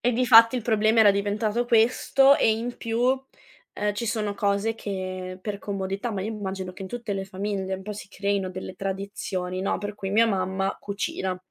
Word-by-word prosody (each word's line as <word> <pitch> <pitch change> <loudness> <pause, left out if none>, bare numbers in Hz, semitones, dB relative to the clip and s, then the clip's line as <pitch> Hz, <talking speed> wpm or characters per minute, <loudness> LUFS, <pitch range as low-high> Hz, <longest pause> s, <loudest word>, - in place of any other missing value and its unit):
E 245 - +2
difatti 230 -1 +7
il 250 - -1
problema 220 0 +3
era 210 -2 +8
diventato 210 +3 0
questo 245 +4 +4
e - - +3
in 235 +2 -4
più, 230 0 -2 0.7
ehm, 210 0 -1
ci 230 +3 -3
sono 215 -2 -1
cose 200 +2 0
che 185 -3 -5
per 205 -2 -4
comodità 195 +3 -3
ma 195 - -3
io 215 - -3
mi 220 - -6
immagino 190 -2 -4
che 185 - -9
in 190 - -6
tutte 235 -1 -4
le 195 -1 -3
famiglie 190 0 -3
un 190 - -7
po' 210 +2 -5
si 205 - -9
creino 200 -1 -1
delle 185 0 -7
tradizioni, 190 -1 -4
no, 195 - 0
per 205 0 -5
cui 195 -2 -4
mia 220 +3 +5
mamma 195 -2 -1
cucina. 195 -2 -3
205 Hz, 200 wpm, -25 LUFS, 190-225 Hz, 0.7 s, era